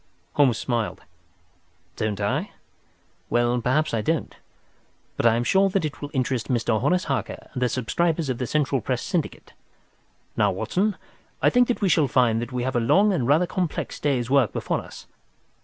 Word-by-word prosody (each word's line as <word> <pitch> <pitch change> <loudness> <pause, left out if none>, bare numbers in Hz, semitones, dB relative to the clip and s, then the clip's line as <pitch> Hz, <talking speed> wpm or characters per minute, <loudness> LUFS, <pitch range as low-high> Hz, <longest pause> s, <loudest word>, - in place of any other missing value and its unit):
Holmes 135 -6 +3
smiled. 120 -3 -2 0.9
"Don't 110 -2 -2
I? 100 0 -1 0.8
Well, 120 0 +1
perhaps 145 +5 +1
I 115 - +1
don't. 160 +7 -2 0.8
But - - +2
I 115 - +4
am 120 - 0
sure 195 +9 +3
that 190 -3 0
it 150 - -6
will 145 - -5
interest 130 -4 -1
Mr. 115 -3 0
Horace 180 +7 +2
Harker 135 - -4
and 125 - -4
the 125 - +2
subscribers 160 +6 0
of 130 -3 -2
the 125 - -2
Central 140 -3 0
Press 125 0 -2
Syndicate. 175 -6 -3 0.8
Now, - - +3
Watson, 200 +2 -1 0.4
I - - +3
think 245 -1 +4
that 245 - -1
we 195 - +2
shall 155 -5 +3
find 120 -3 +2
that 120 - -5
we 125 -1 -2
have 130 0 -2
a - - +3
long 195 - +3
and 130 -10 0
rather 155 +6 +4
complex 175 -3 -3
day's 130 -5 0
work 130 -4 +3
before - - -1
us. - - -12
130 Hz, 180 wpm, -24 LUFS, 120-165 Hz, 0.9 s, I